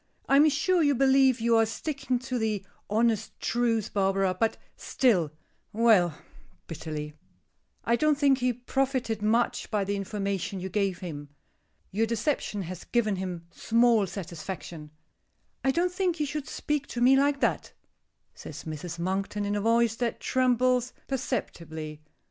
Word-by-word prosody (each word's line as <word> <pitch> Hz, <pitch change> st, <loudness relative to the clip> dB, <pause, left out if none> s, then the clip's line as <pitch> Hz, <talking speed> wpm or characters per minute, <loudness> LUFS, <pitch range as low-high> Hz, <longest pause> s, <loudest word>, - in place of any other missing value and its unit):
I 275 Hz, -, +5 dB
am 305 Hz, +2 st, +7 dB
sure 340 Hz, +5 st, +2 dB
you 285 Hz, -2 st, +3 dB
believe 265 Hz, -1 st, +4 dB
you 230 Hz, 0 st, +3 dB
are 225 Hz, -, +5 dB
sticking 270 Hz, +1 st, -2 dB
to 255 Hz, 0 st, -3 dB
the 215 Hz, -3 st, -1 dB, 0.2 s
honest 220 Hz, 0 st, 0 dB
truth, 230 Hz, -3 st, 0 dB
Barbara, 195 Hz, -1 st, +2 dB
but 225 Hz, +4 st, 0 dB, 0.2 s
still 195 Hz, -, +2 dB, 0.4 s
Well," 205 Hz, -8 st, +4 dB, 0.5 s
bitterly, 155 Hz, -2 st, -6 dB, 0.7 s
"I 235 Hz, +1 st, +2 dB
don't 305 Hz, 0 st, +2 dB
think 275 Hz, -2 st, +3 dB
he 250 Hz, 0 st, +2 dB
profited 250 Hz, -2 st, -1 dB
much 225 Hz, +3 st, +1 dB
by 210 Hz, -3 st, 0 dB
the 200 Hz, +1 st, -2 dB
information 195 Hz, -1 st, -3 dB
you 190 Hz, +1 st, -5 dB
gave 195 Hz, -2 st, -1 dB
him. 145 Hz, -5 st, -7 dB, 0.6 s
Your 225 Hz, +4 st, +1 dB
deception 225 Hz, -3 st, -1 dB
has 180 Hz, 0 st, -7 dB
given 215 Hz, -5 st, +1 dB
him 180 Hz, -3 st, -5 dB
small 230 Hz, -3 st, +3 dB
satisfaction." 170 Hz, -3 st, -7 dB, 0.7 s
"I 270 Hz, -, +2 dB
don't 345 Hz, +6 st, +1 dB
think 360 Hz, -3 st, -1 dB
you 300 Hz, -, +1 dB
should 295 Hz, 0 st, -4 dB
speak 295 Hz, -2 st, -2 dB
to 240 Hz, -, -5 dB
me 255 Hz, +2 st, +6 dB
like 280 Hz, +1 st, +2 dB
that," -, -, 0 dB, 0.6 s
says -, -, -9 dB
Mrs. 160 Hz, +2 st, -6 dB
Monkton, 195 Hz, +4 st, -2 dB
in 205 Hz, 0 st, -1 dB
a 205 Hz, -, -1 dB
voice 230 Hz, +1 st, +3 dB
that 240 Hz, -1 st, -2 dB
trembles 255 Hz, -1 st, +2 dB
perceptibly. 160 Hz, -, -4 dB
225 Hz, 150 wpm, -28 LUFS, 190-260 Hz, 0.7 s, am